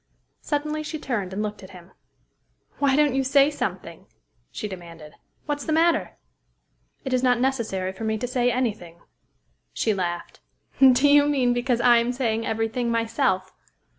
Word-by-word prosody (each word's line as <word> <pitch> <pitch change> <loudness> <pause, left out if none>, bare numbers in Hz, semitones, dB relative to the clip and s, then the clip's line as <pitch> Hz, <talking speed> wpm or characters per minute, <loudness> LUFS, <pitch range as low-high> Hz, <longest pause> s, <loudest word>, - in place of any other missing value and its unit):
Suddenly 300 +1 -2
she 310 +1 -5
turned, 220 -10 -3
and 200 +3 -3
looked 210 -1 -5
at 190 - -12
him. 175 0 -16 0.9
"Why 275 -2 +3
don't 295 -2 +3
you 270 0 +1
say 280 +2 +4
something?" 290 - -5 0.4
she 210 - -5
demanded. 170 -5 -10 0.3
"What's 290 -1 -3
the - - -3
matter?" 325 +1 +1 0.9
"It 265 - -2
is 255 - +2
not 250 -2 +2
necessary 230 -8 -1
for 190 - -8
me 220 0 -1
to 235 - -3
say 245 0 +1
any 245 -2 0
thing." 170 -4 -15 0.7
She 220 - 0
laughed. 175 -3 -4 0.4
"Do 265 +1 +6
you 290 0 +5
mean 260 -4 +2
because 245 0 0
I 240 -1 +6
am 235 +1 0
saying 230 -3 -1
every 225 0 0
thing 235 +1 -2
myself? 225 -5 0
245 Hz, 165 wpm, -24 LUFS, 210-275 Hz, 0.9 s, Do